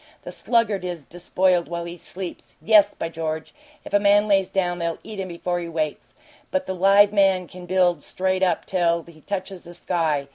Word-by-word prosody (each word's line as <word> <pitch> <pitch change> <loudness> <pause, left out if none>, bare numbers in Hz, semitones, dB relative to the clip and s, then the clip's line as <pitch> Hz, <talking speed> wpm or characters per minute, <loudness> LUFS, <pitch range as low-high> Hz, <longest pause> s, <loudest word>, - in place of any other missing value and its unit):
The - - -7
sluggard 225 -5 0
is 175 -5 -5
despoiled 175 0 +1
while 170 0 -4
he 170 0 -7
sleeps 180 +1 -8
yes, 215 -2 +4
by - - -3
George! 160 -1 -4 0.3
if - - -10
a 205 - +5
man 205 +1 +4
lays 195 -2 +2
down 180 -2 -1
they'll 170 -1 -2
eat 215 -2 -8
him 190 - -3
before 175 0 -3
he 170 -1 -5
wakes! 155 -2 -4 0.3
but 280 0 -1
the 190 - -3
live 200 +2 +5
man 190 -3 +3
can 180 0 -11
build 180 -3 +2
straight 185 +3 -1
up 180 -3 +1
till 170 -2 +1
he 160 -2 -17
touches 190 +1 -5
the 175 0 -12
sky! 160 -5 -1
180 Hz, 195 wpm, -23 LUFS, 170-195 Hz, 0.3 s, a